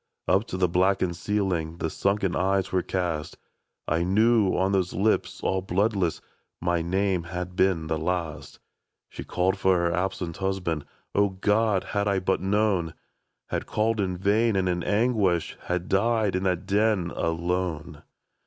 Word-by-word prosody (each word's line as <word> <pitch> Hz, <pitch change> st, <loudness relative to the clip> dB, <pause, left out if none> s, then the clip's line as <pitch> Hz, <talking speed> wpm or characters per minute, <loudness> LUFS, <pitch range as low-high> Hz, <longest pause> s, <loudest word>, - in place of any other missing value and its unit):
" -, -, -55 dB
Up 95 Hz, +4 st, +3 dB
to 90 Hz, -, -4 dB
the 90 Hz, -1 st, +3 dB
blackened 90 Hz, 0 st, +1 dB
ceiling 90 Hz, -4 st, -1 dB
The 80 Hz, -2 st, -2 dB
sunken 100 Hz, -2 st, 0 dB
eyes 95 Hz, 0 st, +1 dB
were 95 Hz, -, +2 dB
cast 85 Hz, -5 st, -3 dB, 0.2 s
— -, -, -54 dB
I 80 Hz, +2 st, +1 dB
knew 105 Hz, +2 st, +3 dB
on 95 Hz, +2 st, +1 dB
those 95 Hz, -2 st, 0 dB
lips 105 Hz, +4 st, 0 dB
all 95 Hz, 0 st, +1 dB
bloodless 95 Hz, -1 st, 0 dB, 0.4 s
My 85 Hz, 0 st, 0 dB
name 95 Hz, 0 st, 0 dB
had 90 Hz, +1 st, -5 dB
been 95 Hz, -4 st, +2 dB
the 80 Hz, 0 st, -2 dB
last; 85 Hz, -2 st, -3 dB, 0.5 s
She -, -, -8 dB
'd -, -, -10 dB
called 90 Hz, +2 st, 0 dB
for 95 Hz, -1 st, +3 dB
her 85 Hz, 0 st, +1 dB
absent 90 Hz, -1 st, -2 dB
husband 95 Hz, -6 st, -2 dB, 0.2 s
— -, -, -46 dB
O 100 Hz, 0 st, +3 dB
Grod! 105 Hz, +1 st, +1 dB
had 100 Hz, 0 st, -1 dB
I 100 Hz, -1 st, +2 dB
but 95 Hz, 0 st, 0 dB
known! 95 Hz, -4 st, +1 dB, 0.3 s
— -, -, -54 dB
Had -, -, -2 dB
called 110 Hz, +1 st, 0 dB
in 90 Hz, -2 st, -1 dB
vain, 105 Hz, +4 st, +2 dB
and 95 Hz, -1 st, +1 dB
in 90 Hz, -1 st, 0 dB
anguish 100 Hz, -5 st, +1 dB
Had 90 Hz, 0 st, -2 dB
died 110 Hz, 0 st, +2 dB
in 95 Hz, -, 0 dB
that 90 Hz, -2 st, 0 dB
den 100 Hz, -4 st, +1 dB
— -, -, -11 dB
alone. 85 Hz, -2 st, -2 dB
95 Hz, 175 wpm, -26 LUFS, 85-100 Hz, 0.5 s, Up